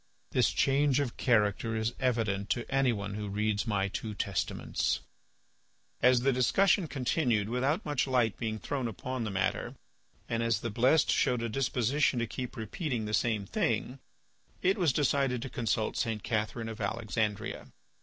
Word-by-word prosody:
This - - +3
change 140 0 +2
of 140 -5 -2
character 110 -1 +2
is 110 +2 -1
evident 110 -6 0
to 120 - 0
anyone 115 -7 +1
who 105 0 -4
reads 105 +1 0
my 100 -3 +1
two 105 +2 -5
Testaments." 100 -2 -1 1.0
As 125 0 +5
the 135 +1 +3
discussion 175 - +3
continued 125 -6 0
without 135 - 0
much 145 -2 0
light 125 -5 +2
being 110 -2 -3
thrown 130 +2 -3
upon 120 +3 -4
the - - -2
matter 95 -1 -1 0.5
and 115 0 -1
as 115 -3 +1
the 115 - -3
blessed 130 +8 +3
showed 125 -2 +2
a 115 - -1
disposition 130 +2 +1
to 120 - +1
keep 125 +3 -6
repeating 115 - -3
the 105 - -4
same 110 -3 +1
thing, 120 +6 -1 0.6
it 190 +2 +4
was 175 -7 +2
decided 135 -2 +1
to 135 - -6
consult 110 -3 -1
St. 110 -3 -1
Catherine 110 0 -2
of 110 0 -7
Alexandria. 110 0 -2
115 Hz, 155 wpm, -30 LUFS, 110-130 Hz, 1.0 s, As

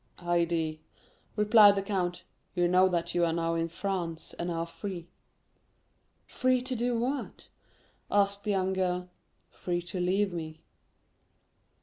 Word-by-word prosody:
"Haydée," 170 -2 0 0.6
replied 210 -1 +7
the 195 - -1
count, 185 -3 -2 0.3
"you 175 -1 +3
know 185 +1 +5
that 170 -2 -1
you 175 - +2
are 170 - +2
now 165 0 0
in 165 0 0
France, 170 -2 -4
and 175 - -2
are 165 -1 -2
free." 175 0 -7 1.2
"Free 255 0 +1
to 255 0 -3
do 240 0 0
what?" 260 +5 -3 0.6
asked 200 0 +2
the - - -4
young 190 -1 +1
girl. 180 -1 -1 0.4
"Free 175 -1 -3
to 180 +1 -5
leave 190 +2 +1
me." 160 -2 -6
180 Hz, 135 wpm, -29 LUFS, 170-200 Hz, 1.2 s, replied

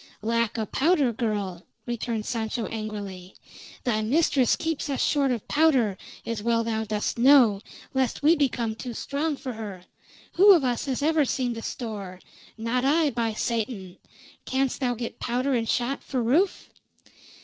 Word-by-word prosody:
"Lack 230 0 0
o' 220 - -1
powder, 280 - +2
girl," 205 -6 -3 0.2
returned 235 -2 -3
Sancho 225 -1 -2
angrily. 205 -4 -6 0.5
"Thy 220 -3 +1
mistress 265 +1 +3
keeps 320 -2 -3
us 275 - -1
short 280 -2 +2
of 240 -4 -2
powder, 270 -10 +3 0.3
as 230 -2 -3
well 230 +1 +1
thou 220 -1 -1
dost 215 +2 -2
know, 240 -6 +6 0.3
lest 265 0 0
we 315 +3 +6
become 245 -7 0
too 235 +1 -7
strong 290 +5 -2
for 255 -2 -5
her. 205 -5 -7 0.5
Who 400 +2 +9
of 335 -6 +3
us 245 -2 0
has 270 0 -2
ever 315 0 +3
seen 255 -2 -1
the 230 - -6
store? 205 -7 -6 0.4
Not 230 +3 -1
I, 300 +2 +3
by 230 -1 -1
Satan! 215 -5 -3 0.5
Canst 265 0 -1
thou 250 -3 0
get 235 0 -6
powder 250 +3 0
and 230 -3 0
shot 250 +3 0
for 255 -3 -2
Rufe?" 325 - +1
240 Hz, 160 wpm, -26 LUFS, 220-275 Hz, 0.5 s, Who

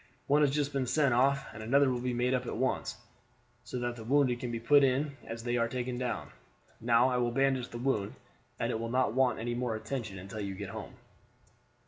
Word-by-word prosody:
One 145 +2 +3
has 145 - +5
just 145 0 -1
been 135 -2 0
sent 140 -1 +3
off, 135 +3 +3
and 110 - -8
another 135 +4 +3
will 125 -1 -2
be 125 0 -1
made 125 +1 +1
up 125 -1 -1
at - - -3
once, 130 -3 -1 0.7
so 120 +1 -5
that 120 -1 -2
the 115 - -9
wounded 130 0 +2
can 125 - -4
be 115 -1 -3
put 140 +5 +5
in 135 +2 +3 0.2
it - - -18
as 115 0 -6
they 120 0 0
are 115 -1 +2
taken 125 0 -3
down. 125 -1 -3 0.5
Now 120 +2 +4
I 125 - 0
will 120 -1 +1
bandage 135 0 +1
the 120 - -7
wound, 120 -5 -1 0.4
and - - 0
it 110 - -2
will 115 0 -3
not 125 -1 +1
want 130 0 +2
any 120 +1 -2
more 120 -2 -1
attention 110 -2 -4
until 95 +3 -7
you 100 -2 -4
get 100 0 -6
home." - - -8
125 Hz, 230 wpm, -31 LUFS, 115-135 Hz, 0.7 s, has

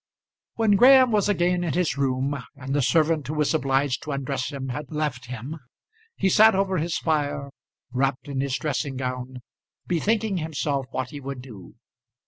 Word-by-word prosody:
When 215 -3 +3
Graham 260 +1 +7
was 210 -1 +2
again 180 -2 +1
in 165 -5 -1
his 180 -1 +1
room, 135 0 0 0.2
and 135 -1 -5
the 145 - +2
servant 155 +2 +2
who 155 - -3
was 150 0 +1
obliged 135 -3 +1
to 150 - -6
undress 135 -1 -2
him 135 -2 -5
had 145 +3 -5
left 150 -5 -3
him, 130 +6 -6 0.6
he - - +1
sat 215 +2 +6
over 190 -2 +1
his 165 +2 -1
fire, 145 -3 -1 0.4
wrapped 135 +1 -1
in 135 -2 -2
his 140 -1 -1
dressing 140 -2 -2
gown, 125 -1 -5 0.4
bethinking 205 +4 0
himself 145 -4 -2
what 130 +1 -4
he 145 - -7
would 135 -2 -6
do. 105 -9 -12
145 Hz, 170 wpm, -25 LUFS, 130-170 Hz, 0.6 s, Graham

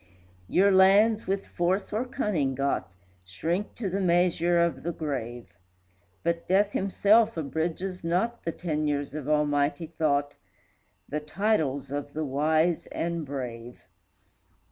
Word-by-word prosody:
Your 200 - +4
lands, 200 +4 +5
with 195 +1 -1
force 185 +4 -1
or 225 +4 0
cunning 175 - -1
got, 135 -8 -1 0.3
Shrink 165 - -3
to 225 - -3
the 190 +2 -1
measure 175 -1 +2
of 170 0 +1
the 170 - -2
grave; 120 - -5 0.7
But 170 0 -1
Death 200 +2 +3
himself 205 +2 +3
abridges 165 +4 -3
not 190 +8 -1
The 165 - -1
tenures 150 -5 -2
of 150 -1 -5
almighty 145 +1 +1
thought, 145 -3 0 0.7
The 150 - -2
titles 150 -5 -1
of 145 0 -4
the 155 0 -2
wise 155 +5 +1
and 170 -1 -3
brave. 125 -3 -6
165 Hz, 125 wpm, -27 LUFS, 145-190 Hz, 0.7 s, lands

